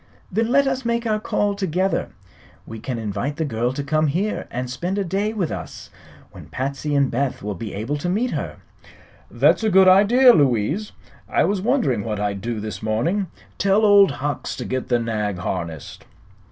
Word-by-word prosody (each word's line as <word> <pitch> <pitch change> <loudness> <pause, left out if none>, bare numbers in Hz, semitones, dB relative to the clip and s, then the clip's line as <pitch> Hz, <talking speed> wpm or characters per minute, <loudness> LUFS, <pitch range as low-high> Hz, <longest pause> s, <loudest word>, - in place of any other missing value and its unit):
"Then 220 +4 +1
let 280 +2 +4
us 265 -1 -1
make 235 0 -1
our 215 -1 +1
call 205 -1 0
together. 190 -1 -1 0.6
We 110 - -8
can 125 +1 -4
invite 110 +6 -3
the 160 - -2
girl 120 -2 -1
to 145 +1 -4
come 155 +2 +1
here 185 +9 -2
and 125 +1 -4
spend 175 +11 -3
a 200 - +1
day 195 +4 -1
with 195 -8 -2
us, - - -7 0.4
when - - -12
Patsy 140 +3 -3
and 140 -2 +2
Beth 130 -1 -2
will 105 0 -3
be 100 +2 -7
able 115 +9 -2
to 160 +5 -3
meet 225 +7 0
her." - - -4 0.7
"That's - - +3
a 220 - +3
good 190 -1 +6
idea, 230 +7 +7
Louise. 145 - +1 0.4
I - - +2
was 200 -2 0
wondering 200 - +1
what 105 -1 -3
I'd 100 -1 -2
do 115 0 -3
this 105 -3 -6
morning. 160 - 0 0.3
Tell 200 +2 +3
Old 200 -2 +7
Hucks 145 +1 -3
to 125 - -6
get 130 0 -3
the 120 - +2
nag 105 -4 -2
harnessed." 85 -4 -5
145 Hz, 190 wpm, -22 LUFS, -, 0.7 s, idea